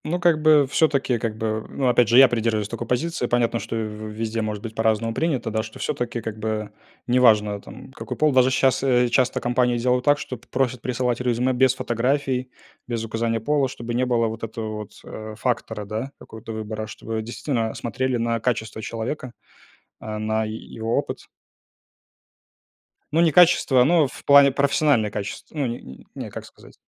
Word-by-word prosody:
Ну, 175 +3 -1
как 170 -3 +3
бы, 150 -2 +6
всё-таки, 135 -3 +1
как 110 -1 -3
бы, 110 -1 -2
ну, 135 - -1
опять 125 -1 +4
же, 120 - +5
я 135 0 +10
придерживаюсь 110 -3 0
такой 115 +1 -6
позиции. 135 +1 -1
Понятно, 120 -1 +1
что - - -5
в 110 -1 -4
везде 110 +1 -3
может 105 -1 -4
быть 115 -1 -6
по-разному 110 0 +1
принято, 135 -6 -1
да, 110 0 0
что 110 0 -10
всё-таки, 120 -1 -3
как 110 -1 -6
бы, 110 -1 -3 0.3
неважно, 110 -5 +3
там, - - -12
какой 130 - -7
пол. 155 -1 +3
Даже 130 0 +5
щас, 130 0 +2
э, 125 -2 +3
часто 125 +1 +2
компании 125 0 +1
сделают 125 +1 +1
так, 145 0 +5
чтоб 130 -4 -6
п - - -22
просят 125 -2 -1
присылать 125 -1 -1
резюме 125 +1 +1
без 130 0 +3
фотографий, 130 +2 -1 0.4
без 115 -2 -3
указания 115 0 -1
пола, 140 +4 +1
чтобы 120 -2 -6
не 125 +2 +1
было 120 -2 +2
вот 110 +1 -6
этого 110 -1 -5
вот, 105 -1 -8
э, 110 0 -8
фактора, 110 -3 -2
да, 110 +7 -4
какого-то 110 +1 -10
выбора. 110 0 -5
Чтобы 110 +1 -5
действительно 115 0 -3
смотрели 130 +2 -2
на 115 0 0
качество 110 -2 -2
человека, 120 +4 -5 0.7
а 110 0 -5
на 110 +1 0
е 110 0 -4
его 115 0 -3
опыт. - - -4 1.9
Ну, 160 - +3
не 170 -1 +5
качество, 165 -7 +5
но 160 +1 +4
в - - -12
плане 140 -1 +7
профессиональное 140 -5 +2
качество, 100 +9 -6
но 140 -3 0
не 120 0 -5
не 65 - -13
не, - - -6
как - - -8
сказать. - - -17
120 Hz, 185 wpm, -23 LUFS, 110-130 Hz, 1.9 s, я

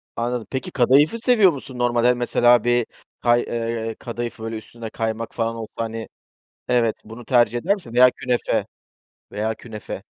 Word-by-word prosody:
Anladım, 120 -2 -2
peki 130 - -4
kadayıfı 140 - +4
seviyor 220 -6 +5
musun? 135 -3 -8
Normalde, 120 0 +2
hani, 125 0 +3
mesela, 120 -1 +4
bir 120 -1 +2 0.4
kay 120 0 +4
eee, 115 -1 -3
kadayıfı, 120 -1 -5
böyle 115 0 -4
üstünde 115 +1 -9
kaymak 115 0 -3
falan 115 0 -1
olsa, 115 -1 -7
hani, 115 0 -4 0.6
evet, 120 -3 +2
bunu 115 +2 -11
tercih 120 -2 +3
eder 190 +10 +2
misin? 175 - -10
Veya 125 +1 +7
künefe, 125 -1 -1 0.7
veya 110 +2 -1
künefe. 110 -2 -8
120 Hz, 160 wpm, -22 LUFS, 115-125 Hz, 0.7 s, Veya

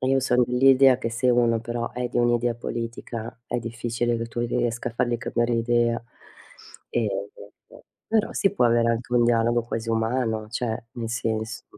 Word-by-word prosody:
Io 135 +1 +2
sono 125 -1 +3
dell'idea 130 +1 +5
che 115 -3 -3
se 125 +2 +1
uno 120 -2 +3
però 120 +1 -4
è 125 0 -3
di 120 - -2
un'idea 120 0 +2
politica 115 -1 -6
è 120 - -2
difficile 120 +1 -2
che 115 0 -3
tu 120 +1 -5
riesca 120 0 -1
a - - -16
fargli 120 0 +1
cambiare 120 +1 0
idea. 115 0 +1 0.9
Ehm, 100 -3 -1 0.8
però 220 -1 +1
si 195 - +2
può 120 - +3
avere 115 0 +3
anche 120 +1 -3
un 120 -1 +4
dialogo 120 0 +2
quasi 115 0 -5
umano, 110 -1 -1
cioè 115 -1 -2
nel 115 -2 -5
senso 110 -1 -3
120 Hz, 170 wpm, -25 LUFS, 115-120 Hz, 0.9 s, dell'idea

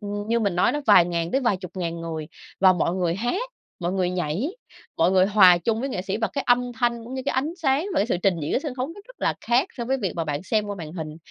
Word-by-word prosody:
như 205 +2 -2
mình 200 -5 0
nói - - +3
đó 295 - -2
vài 170 - +7
ngàn 170 -1 -2
tới 270 - +1
vài 235 -7 +1
chục 185 -2 -9
ngàn 170 -2 -3
người 160 -2 -5 0.3
và 190 -1 +7
mọi 175 0 0
người 175 -2 0
hát, 360 - -2 0.3
mọi 175 +1 -1
người 185 -2 0
nhảy, 180 - -1 0.5
mọi 170 +3 +3
người 190 0 +4
hòa 190 -4 +7
chung 225 +6 -1
với 270 - -2
nghệ 185 -9 -3
sĩ 195 +1 -2
và 225 - -1
cái 280 - -2
âm 245 0 +2
thanh 235 0 -1
cũng 255 +3 -7
như 260 - -3
cái - - +1
ánh 285 +5 0
sáng 275 +6 +2
và - - +2
cái 205 - +2
sự 180 - 0
trình 195 -3 +3
diễn 155 - 0
sân 285 -5 -4
khấu 255 +1 -2
nó 410 - -11
rất - - -17
là - - +1
khác 250 +9 +2
so 235 - -3
với 265 +2 0
việc 195 -9 -2
mà 165 - -1
bạn 150 +2 -3
xem 215 +1 0
qua 205 -1 -4
màn 155 -1 -7
hình. 155 -3 -6
205 Hz, 285 wpm, -24 LUFS, 175-245 Hz, 0.5 s, vài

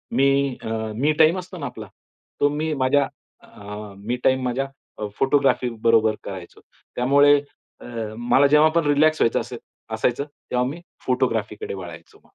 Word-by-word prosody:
मी 140 -1 +2
अ, - - -7 0.3
मी 140 +7 +2
time 160 +3 +5
असतो 185 0 -9
ना 145 - -5
आपला 110 -5 -7 0.5
तो 145 - +5
मी 155 +2 -2
माझ्या 135 0 +2 0.3
अ, 105 0 -10
मी 110 +5 -3
टाईम 130 0 +3
माझ्या 125 +2 -1 0.5
फोटोग्राफी 135 -2 +2
बरोबर 110 -2 +4
करायचो. 95 -3 -9 0.3
त्यामुळे 140 +3 +5 0.4
अ, - - -12 0.3
मला 120 +4 +4
जेव्हा 150 +2 +5
पण 170 -2 +3
रिलॅक्स 155 +2 +3
व्हायचं 115 - +3
असे - - -6 0.4
असायचं 125 +3 0
तेव्हा 125 -4 -3
मी 165 +5 -8 0.2
फोटोग्राफीकडे 115 -6 -1
वळायचो. 90 -4 -10
130 Hz, 145 wpm, -23 LUFS, 115-145 Hz, 0.5 s, टाईम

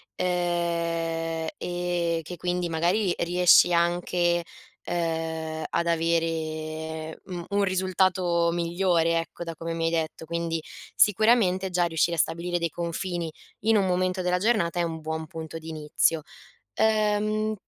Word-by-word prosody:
uhm 170 -2 -1 0.2
e 175 -1 -1
che 175 +2 -8
quindi, 175 0 -1
magari, 175 +4 +1
riesci 175 0 +5
anche, 175 0 +1 0.4
uhm, 160 -2 -2
ad 170 - 0
avere, 160 -1 -2
mhmm, 175 -2 -6
un 200 0 +1
risultato 185 -2 +2
migliore, 170 -1 +1
ecco, 165 +1 -6
da 165 - -5
come 165 +1 -4
mi 165 0 -1
hai 165 - +1
detto. 160 -1 -2
Quindi, 165 0 -2 0.3
sicuramente, 205 -3 +4
già 180 -1 +2
riuscire 170 0 +1
a - - -3
stabilire 170 +3 0
dei 170 0 0
confini 170 +1 -3 0.3
in 220 +1 +4
un 195 - +3
momento 185 0 0
della 180 0 +1
giornata 190 -5 +1
è - - +2
un 165 -1 -4
buon 160 0 -3
punto 160 +1 -7
di 160 0 -9
inizio. 155 +1 +1 0.6
Uhm, 215 0 +2
170 Hz, 135 wpm, -26 LUFS, 165-180 Hz, 0.6 s, riesci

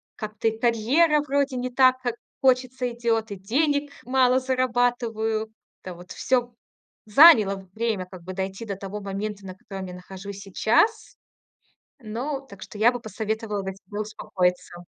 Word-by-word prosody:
как-то 215 0 -3
и 220 0 0
карьера 260 +7 +3
вроде 280 -2 0
не 250 +1 -2
так, 255 0 +4
как 240 -2 -2 0.3
хочется, 255 -1 +2
идет, 230 -2 -1
и - - -3
денег 285 +8 0
мало 255 0 +3
зарабатываю. 240 -4 0 0.3
Это 185 - -6
вот 175 +1 -13
всё 245 -2 0 0.5
заняло 210 - +6
время, 220 -4 -1
как 185 -3 -11
бы 185 - -7
дойти 190 +3 -4
до 200 -3 -5
того 200 +1 -6
момента, 200 0 -5
на 185 - -8
котором 190 0 -8
я 180 - -8
нахожусь 190 +2 -9
сейчас. 235 - +1 0.8
Но 255 +5 -4
Так 200 -8 -15
что 210 - -9
я 230 +3 +5
бы 245 - -5
посоветовала 220 -1 -3
бы 190 - -3
тебе 200 +2 -7
успокоиться. 180 -4 -2
220 Hz, 150 wpm, -25 LUFS, 195-255 Hz, 0.8 s, заняло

